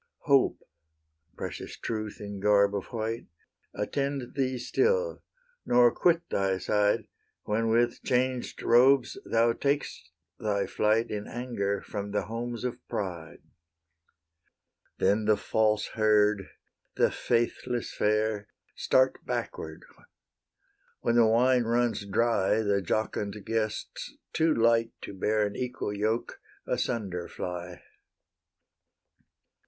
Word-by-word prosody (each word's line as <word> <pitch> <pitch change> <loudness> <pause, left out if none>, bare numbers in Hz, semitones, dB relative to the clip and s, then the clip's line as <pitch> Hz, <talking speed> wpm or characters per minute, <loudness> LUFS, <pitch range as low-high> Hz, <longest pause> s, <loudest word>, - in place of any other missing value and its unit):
Hope, 140 -2 +3 0.8
precious - - -6
Truth 110 -2 -4
in 100 -1 -6
garb 100 0 +4
of 100 - -3
white, 115 0 -4 0.5
Attend 135 +4 -2
thee 130 -2 0
still, 475 - +1 0.4
nor 120 -1 +5
quit 170 -1 +2
thy 95 -1 +1
side 105 +2 +1 0.4
When 115 +2 0
with 120 +1 +2
changed 125 0 -1
robes 130 +2 +4
thou 115 +1 +3
tak'st 140 +4 -2 0.3
thy 100 -2 0
flight 110 +4 +1
In 105 -1 -4
anger 100 -5 -2
from 100 -1 -5
the 105 0 -1
homes 120 +2 -5
of 125 -1 -3
pride. 85 -5 -5 1.5
Then 105 +3 +2
the 105 -1 +4
false 110 -1 +1
herd, 105 -2 +2 0.5
the - - +3
faithless 120 +1 -1
fair, 105 -1 0 0.3
Start 130 0 +2
backward; 80 0 -4 1.2
when 115 - +1
the 115 -1 +6
wine 125 +2 +4
runs 115 -3 0
dry, 110 0 +2
The 100 -1 +1
jocund 105 +1 -2
guests, 110 -1 -3 0.2
too 160 0 +3
light 115 0 +3
to - - -7
bear 105 +2 +1
An 100 - -4
equal 125 -4 -3
yoke, 110 +3 -2 0.2
asunder 95 -8 -2
fly. 90 0 -6
110 Hz, 110 wpm, -28 LUFS, 105-120 Hz, 1.5 s, the